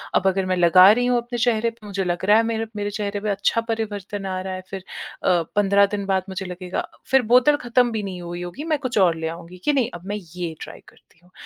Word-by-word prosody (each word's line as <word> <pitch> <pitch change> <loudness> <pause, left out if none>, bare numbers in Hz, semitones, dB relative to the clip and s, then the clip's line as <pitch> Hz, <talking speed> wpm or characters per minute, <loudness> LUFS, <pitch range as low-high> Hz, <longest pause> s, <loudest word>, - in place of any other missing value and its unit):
अब 190 - +3
अगर 190 0 +1
मैं 185 0 0
लगा 185 +2 +7
रही 245 +1 0
हूँ 245 0 +2
अपने 240 0 -4
चेहरे 230 -1 +2
प 230 - -15
मुझे 200 -1 -3
लग 175 0 -2
रहा 210 +2 +6
है, 225 - +4
मेरे 225 0 -1
मेरे 205 0 -2
चेहरे 205 -1 -3
पे 210 - -2
अच्छा 205 +3 +1
परिवर्तन 205 -3 -4
आ 185 -1 -3
रहा 190 0 -5
है, 185 - -5
फिर 195 -1 -6 0.4
अ, 175 -2 +3
15 200 0 +4
दिन 200 -1 -4
बाद 190 -1 +1
मुझे 190 0 -5
लगेगा 180 0 -5 0.2
फिर 265 - +6
बोतल 275 +4 +6
खत्म 245 -2 +1
भी 220 -2 -3
नहीं 185 -2 -6
हुई 175 0 -6
होगी, 175 +12 -7
मैं 310 -2 0
कुछ 255 -4 -3
और 175 -3 +4
ले 160 0 -3
आऊँगी 170 +2 -8
कि, 295 - +3
"नहीं, 255 -5 +1
अब 175 +1 -9
मैं 205 - -2 0.2
ये 170 -3 -4
ट्राई - - -9
करती - - -27
हूँ।" 180 - -24
200 Hz, 255 wpm, -22 LUFS, 185-230 Hz, 0.4 s, लगा